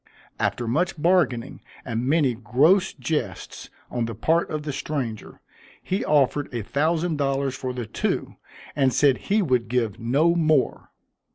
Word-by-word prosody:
After 120 - -1
much 160 +7 0
bargaining, 150 -8 +1 0.2
and 120 0 -2
many 145 -5 +3
gross 140 - +3
jests 150 +4 -4 0.2
on 120 -2 -1
the 115 -1 -5
part 165 +10 +1
of 155 -1 -3
the 145 -2 -4
stranger, 130 -6 -5 0.4
he 190 +2 -2
offered 145 -1 +2
a 120 -3 -3
thousand 160 - 0
dollars 135 -1 0
for 130 -1 -4
the 125 -2 -5
two, - - -2 0.4
and 135 -2 +3
said 135 -1 +3
he 210 +1 +3
would 125 -7 +1
give 115 -5 -1
no 140 +9 +2
more. 155 -5 +1
140 Hz, 150 wpm, -24 LUFS, 125-160 Hz, 0.4 s, many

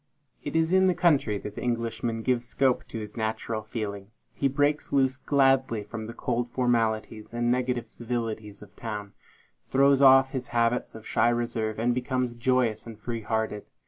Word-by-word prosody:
It 145 - -5
is 165 +2 +2
in 190 0 +5
the 180 - +2
country 145 -12 +2
that 100 +1 -7
the - - -7
Englishman 115 -1 -2
gives 120 -1 0
scope 130 +1 +1
to - - -7
his 105 -1 -7
natural 110 0 -2
feelings. 105 -1 -6
He 140 - +1
breaks 145 +2 0
loose 130 -2 +3
gladly 135 -5 +2
from 110 +1 -7
the 115 - -7
cold 120 0 -2
formalities 115 -3 -1
and 120 0 +1
negative 125 -1 0
civilities 110 -3 -4
of 105 - -17
town; 105 -3 -6 0.6
throws 140 0 +4
off 135 -1 +7
his 130 -2 -4
habits 115 +1 +1
of 110 - -10
shy 115 +2 +2
reserve, 115 -2 -1
and 120 +2 +1
becomes 125 -1 -1
joyous 120 -3 +1
and 115 -2 -9
free 115 +1 -4
hearted. 110 -1 -2
120 Hz, 175 wpm, -27 LUFS, 110-130 Hz, 0.6 s, off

